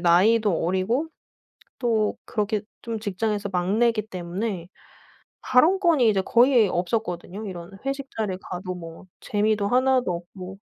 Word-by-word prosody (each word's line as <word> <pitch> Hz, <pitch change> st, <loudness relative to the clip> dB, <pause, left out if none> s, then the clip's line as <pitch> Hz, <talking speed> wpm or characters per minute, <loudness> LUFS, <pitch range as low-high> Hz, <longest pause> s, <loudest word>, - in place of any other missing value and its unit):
나이도 185 Hz, +2 st, +4 dB
어리고 200 Hz, -, 0 dB, 0.7 s
또 225 Hz, -4 st, +1 dB
그렇게 210 Hz, -1 st, -1 dB, 0.2 s
좀 230 Hz, -1 st, -4 dB
직장에서 205 Hz, 0 st, -2 dB
막내기 210 Hz, +5 st, +1 dB
때문에 180 Hz, -1 st, -4 dB, 0.7 s
발언권이 315 Hz, -, +4 dB
이제 200 Hz, -2 st, +2 dB
거의 235 Hz, +3 st, +4 dB
없었거든요. 180 Hz, +1 st, -2 dB
이런 180 Hz, -2 st, -7 dB
회식 275 Hz, 0 st, -3 dB
자리에 205 Hz, -4 st, -1 dB
가도 185 Hz, 0 st, -5 dB
뭐 165 Hz, 0 st, -10 dB, 0.2 s
재미도 210 Hz, -1 st, +1 dB
하나도 255 Hz, -4 st, +3 dB
없고 180 Hz, +2 st, -8 dB
210 Hz, 290 characters per minute, -24 LUFS, 185-230 Hz, 0.7 s, 나이도